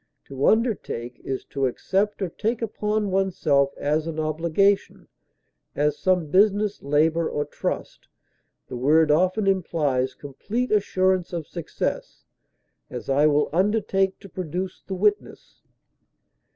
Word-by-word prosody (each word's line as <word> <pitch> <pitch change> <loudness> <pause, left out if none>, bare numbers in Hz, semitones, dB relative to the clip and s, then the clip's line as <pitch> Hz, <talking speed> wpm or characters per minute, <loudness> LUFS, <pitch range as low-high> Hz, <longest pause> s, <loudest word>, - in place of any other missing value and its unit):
To 135 0 -1
undertake 205 - 0
is 135 -1 -5
to 135 -1 0
accept 200 +10 -1
or 185 - -2
take 225 +6 -2
upon 210 -1 -1
oneself 155 -8 +2
as 150 +2 0
an 160 -1 -4
obligation, 165 +6 0 0.7
as 150 0 +1
some 180 -1 +1
business, 205 +1 +3
labor, 160 +4 +2
or 145 - -2
trust; 150 - -5 0.6
the - - -7
word 150 +5 +4
often 185 +6 +2
implies 150 -9 0
complete 210 - -4
assurance 185 -3 +1
of 165 -3 -3
success; 170 0 -5 0.6
as, - - -7
I 145 +3 +4
will 150 -1 +2
undertake 195 0 +1
to - - -11
produce 180 +1 -5
the 190 - -6
witness. 205 +2 -1
175 Hz, 125 wpm, -24 LUFS, 150-200 Hz, 0.7 s, word